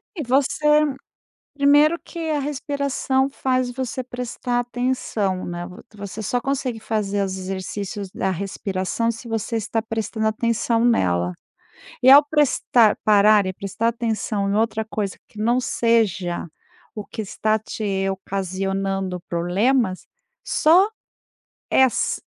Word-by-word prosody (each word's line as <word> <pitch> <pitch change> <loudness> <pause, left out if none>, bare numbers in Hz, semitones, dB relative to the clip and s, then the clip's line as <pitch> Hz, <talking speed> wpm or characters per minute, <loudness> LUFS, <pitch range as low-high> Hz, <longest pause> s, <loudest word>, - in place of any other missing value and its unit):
É 315 - -3
você 300 +4 +3 0.7
Primeiro 290 +3 +5
que - - -10
a 300 -1 0
respiração 280 -1 -1
faz 255 -2 0
você 255 0 -4
prestar 245 0 -3
atenção, 245 -6 -1
né, 175 0 -5
vo 180 0 -12
você 200 +1 -7
só 245 +4 -1
consegue 255 -3 -2
fazer 205 -2 -1
os 190 0 -4
exercícios 190 +1 -5
da 190 - -2
respiração 195 +3 -2
se 230 +2 -10
você 225 +1 -3
está 225 +1 -1
prestando 220 0 -3
atenção 230 +1 +1
nela. 90 - +2 0.7
E - - +4
ao 285 +2 +10
prestar 280 -7 +3
parar 210 -1 +5
e 185 - -3
prestar 200 +4 -2
atenção 220 -3 -1
em - - 0
outra 220 0 0
coisa 205 -3 -3
que 210 - -13
não 235 +3 +2
seja 210 -9 0 0.5
o 210 - -6
que 220 +1 -6
está 215 +2 0
te 200 -3 -3
ocasionando 195 0 -3
problemas, 185 +5 +1 0.4
só, 350 +6 +4 0.8
eh, 265 - +5
ass 260 - +1
220 Hz, 130 wpm, -22 LUFS, 195-255 Hz, 0.8 s, ao